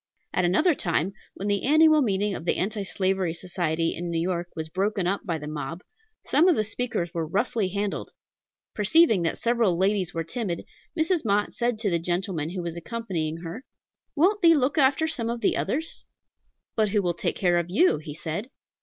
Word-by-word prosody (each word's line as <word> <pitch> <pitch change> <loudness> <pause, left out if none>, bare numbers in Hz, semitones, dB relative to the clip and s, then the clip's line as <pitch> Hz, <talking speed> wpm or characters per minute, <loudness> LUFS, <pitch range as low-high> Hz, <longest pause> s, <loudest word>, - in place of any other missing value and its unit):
At 180 - +2
another 310 - +3
time, 175 - -1 0.2
when 200 - -4
the 200 -1 +1
annual 310 +2 +5
meeting 205 -4 +1
of 160 - -5
the - - +1
Anti 210 +2 -1
Slavery 190 -3 0
Society 165 -2 -1
in 175 +1 -4
New 170 - -1
York 175 0 -1
was 160 -1 -4
broken 195 +3 -1
up 195 +3 0
by 165 -2 0
the 150 - -8
mob, 155 +3 -5 0.4
some 330 +5 +4
of 360 - +5
the 215 - +1
speakers 215 -6 -3
were 165 -2 -2
roughly 205 +3 0
handled. 200 +1 -3 0.6
Perceiving 220 - +4
that 165 - -1
several 230 -7 +2
ladies 190 -1 +1
were 165 -1 -2
timid, 180 -1 -4 0.3
Mrs. 325 +1 +1
Mott 205 -1 +1
said 240 -1 0
to 215 -3 -1
the 170 - +2
gentleman 175 -2 -2
who 180 0 -4
was 170 -1 -4
accompanying 170 -6 -4
her, 175 +10 -6 0.5
"Won't 390 +7 +3
thee 335 -2 +7
look 280 +2 +1
after 275 +3 +4
some 255 -8 -2
of 235 0 -3
the - - +2
others?" 320 +4 -2 0.7
"But 215 -2 +2
who 205 0 +1
will 175 -1 +1
take 170 - -2
care 175 -2 +2
of 170 0 -4
you?" 210 - +3
he 150 -1 -8
said. 170 +9 -4
195 Hz, 195 wpm, -26 LUFS, 170-235 Hz, 0.7 s, thee